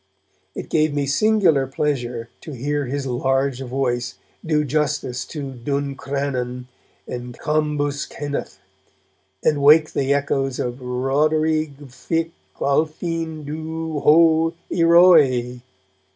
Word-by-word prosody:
It - - -7
gave 155 -1 +2
me 145 -1 0
singular 160 -3 +3
pleasure 125 -5 -3
to 155 - -8
hear 145 +3 -2
his 140 +2 -3
large 135 +1 0
voice 125 -1 -2 0.3
do 155 -2 +1
justice 145 -3 -1
to 140 -4 -6
'Duncrannon' 135 -1 -3 0.4
and 125 0 -7
'Cambus 150 -2 -1
Kenneth', 145 -1 -5 0.9
and 145 -2 +2
wake 155 +2 +6
the 135 0 0
echoes 135 -2 0
with 125 +1 -3
'Rhoderigh 150 +4 0
Vich 160 +4 -3 0.3
Alphine 160 +2 -1
dhu, 160 +1 -4
ho! 165 +1 +4 0.2
ieroe!' 160 -8 +5
145 Hz, 105 wpm, -21 LUFS, 130-155 Hz, 0.9 s, wake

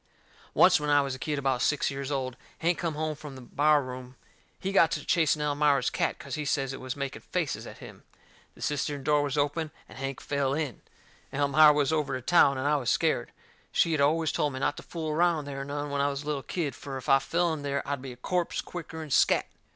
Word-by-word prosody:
Oncet, - - +6
when 150 0 -2
I 145 0 +5
was 135 -1 -3
a 130 - -7
kid 150 +1 -2
about 135 -3 0
six 150 -1 +1
years 135 0 -4
old, 130 -3 -2 0.2
Hank 170 +1 0
come 165 -3 -2
home 155 0 -1
from 150 -2 -10
the 130 - -10
bar 145 +3 +3
room. 125 0 -8 0.4
He 190 - -2
got 170 -4 +5
to - - -4
chasing 155 -3 +2
Elmira's 145 -3 +2
cat - - 0
cause 140 - -9
he 150 - -2
says 135 -2 -1
it - - -7
was 130 0 -4
making 140 -2 -5
faces - - -3
at - - -10
him. - - -12 0.5
The - - -9
cistern 145 -1 -2
door 150 0 +3
was 145 -1 -2
open, 145 +2 0 0.2
and - - -12
Hank 135 -1 -4
fell 140 -1 -1
in. 145 -7 -3 0.5
Elmira 145 +2 +6
was 150 0 +1
over 150 -4 0
to 130 -1 -6
town, 140 -5 +5
and 130 - -3
I 150 0 +3
was 130 -4 -2
scared. - - +1 0.4
She 165 - +2
had 155 -3 +1
always 160 +2 +2
told 145 -2 0
me 130 - -4
not 145 - 0
to - - -6
fool 160 -2 -5
around 165 -1 +2
there 135 -1 -5
none 145 +1 -4
when 140 0 0
I 140 - +2
was 140 0 -4
a - - -14
little 150 -2 -2
kid, 155 -1 -3
fur 135 -1 -7
if 130 - -9
I 135 - +6
fell 170 +4 0
in 155 - -5
there 140 -1 -2
I'd 140 -2 -2
be 135 -1 -7
a - - -16
corpse 175 +7 -1
quicker'n 160 -3 -7
scatt. - - +4
145 Hz, 240 wpm, -28 LUFS, 135-155 Hz, 0.5 s, Oncet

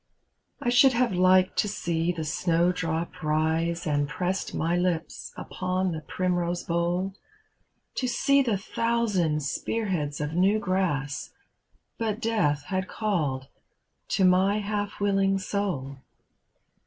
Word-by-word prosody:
I 240 - -1
should 255 +2 +6
have 240 -2 +2
liked 185 +1 +4
to - - +2
see 170 -4 -1
the 165 -2 -4
snowdrop 165 +1 0
rise, 160 +2 0
And 145 -2 0
pressed 185 +4 -2
my 165 +2 0
Ups 170 -2 -2
upon 185 0 -2
the 160 -2 -4
primrose 175 0 -1
bowl. 175 +3 -1 0.8
To 255 - 0
see 275 +3 +3
the 230 -6 +1
thousand 200 -8 0
spear 215 +9 -2
heads 150 -5 -2
of 150 +1 -3
new 190 +5 +3
grass. 180 -9 -1 0.7
But 220 -2 -1
death 180 -12 +1
had 185 +4 -2
called 155 -13 -1 0.6
to 190 - +2
my 190 +3 +4
half 205 0 -3
willing 195 -1 +2
soul. 185 -9 -3
180 Hz, 125 wpm, -27 LUFS, 160-205 Hz, 0.8 s, should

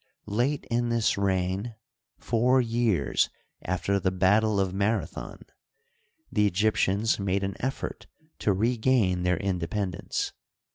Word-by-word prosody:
Late 120 +8 0
in 120 0 +1
this 115 -2 +2
reign, 95 +3 -1 0.4
four 125 +3 +2
years 115 -5 +1 0.3
after 95 +2 0
the 95 - +1
battle 100 +3 +3
of 95 -1 0
Mara 100 +3 +1
thon, - - -9 0.9
the 105 -1 +3
Egyptians 105 +2 +1
made 100 0 0
an 95 0 -2
effort 130 +2 -4 0.3
to 105 - +2
regain 110 -2 +2
their 90 -1 +1
inde 95 0 -2
pendence. 90 0 -2
100 Hz, 125 wpm, -27 LUFS, 95-115 Hz, 0.9 s, battle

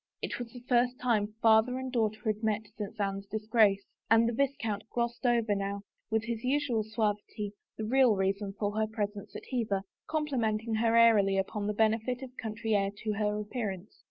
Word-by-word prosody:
It - - -4
was 240 -1 -6
the 245 - -10
first 245 0 +3
time 215 -4 +1
father 225 +3 +5
and 260 0 -4
daughter 220 -3 0
had 215 -1 0
met 220 -1 0
since 210 +1 -6
Anne's 195 0 -2
disgrace 215 -1 +2 0.2
and 225 +1 +5
the 235 - 0
viscount 230 -5 -1
glossed 240 +1 -1
over 230 -3 +2
now, 200 0 -2 0.3
with 220 0 +1
his 230 0 -4
usual 260 -3 +1
suavity, 210 -1 -2 0.3
the 220 - -3
real 250 -1 +4
reason 195 +1 -1
for 205 -1 0
her 220 - +2
presence 205 -2 -4
at - - -6
Hever, 215 -6 0 0.2
complimenting 235 -8 -1
her 225 +1 +2
airily 210 -4 +5
upon 205 +2 -1
the 210 - -1
benefit 225 +4 +1
of 255 -1 -9
country 225 0 -3
air 195 -1 +2
to 215 -1 0
her 210 0 0
appearance. 210 -3 -5
220 Hz, 185 wpm, -30 LUFS, 205-235 Hz, 0.3 s, father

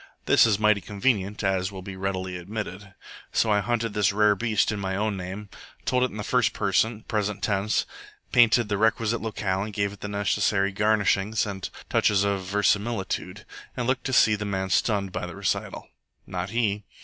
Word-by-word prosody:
This - - +6
is 105 -3 +2
mighty 105 -1 +3
convenient, 105 0 -1
as 95 -1 0
will 95 -1 -8
be 95 0 -7
reality 95 -1 -3
admitted. 95 +1 -6 0.4
So 110 - +2
I 105 - +4
hunted 115 +1 -1
this 105 -1 +2
rare 105 +1 +4
beast 110 +1 +1
in 105 - -3
my 95 -1 -2
own 105 +1 -1
name, 95 +3 -6 0.4
told 125 0 +1
it 130 - +2
in 110 - -9
the 105 - -4
first - - +2
person, 110 -1 0
present 105 -2 -2
tense, 100 +2 +1 0.5
painted 120 -1 +5
the 105 -1 -1
requisite 110 +1 +1
locale, 100 -2 -2
gave 100 -1 -1
it 100 - -13
the - - -5
necessary 100 -1 +1
garnishings 105 +1 +2
and 95 -2 -5 0.2
touches 100 -1 +2
of 100 -1 0
verisimilitude, 105 0 -1 0.3
and 125 - -1
looked 130 +1 0
to 130 - -2
see 110 -3 +5
the 105 0 -2
man 95 -2 -2
stunned 100 0 +1
by 90 - -4
the 85 - -8
recital. - - -3 0.4
Not 90 0 -4
he. 105 -2 0
105 Hz, 185 wpm, -26 LUFS, 95-110 Hz, 0.5 s, This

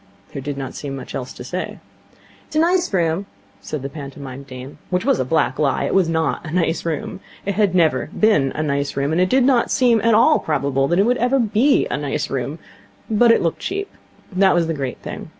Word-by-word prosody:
There 140 - -5
did 140 +1 -4
not 135 -2 -5
seem 140 -2 -6
much 135 - -8
else 130 -1 -5
to - - -9
say. 180 +9 -5 0.7
'It's - - -12
a - - +4
nice 355 +2 +2
room,' 175 +1 0 0.3
said 115 +8 -6
the - - -2
pantomime 140 -2 -8
dame. 130 0 -10
Which 180 0 -1
was - - +2
a 130 - 0
black 140 -2 0
lie. 140 -3 +1
It - - -1
was 190 -4 +3
not 160 -5 0
a 160 - -7
nice 165 0 0
room. 165 +2 -3 0.3
It 200 -1 -1 0.2
never 160 -7 +3
had - - -11
been 180 -12 +3
a 155 - -2
nice 140 -2 -2
room. 140 +2 0
And 165 +3 +2
it 185 - +2
did 260 +3 +4
not 250 -2 +3
seem 240 -4 +3
at 230 0 +4
all 300 +8 +5
probable 140 -3 0
that 175 - +1
it 235 +6 +3
ever 250 +3 +2
would 225 -5 -1
be 270 +6 +4
a - - 0
nice - - -3
room. - - -3 0.5
But 230 +2 +4
it 230 - +3
looked 165 - -1
cheap. 400 +2 -4 0.4
That 190 0 +3
was 170 -1 +2
the 165 - -1
great 135 -4 -4
thing. - - -7
165 Hz, 230 wpm, -20 LUFS, 140-215 Hz, 0.7 s, all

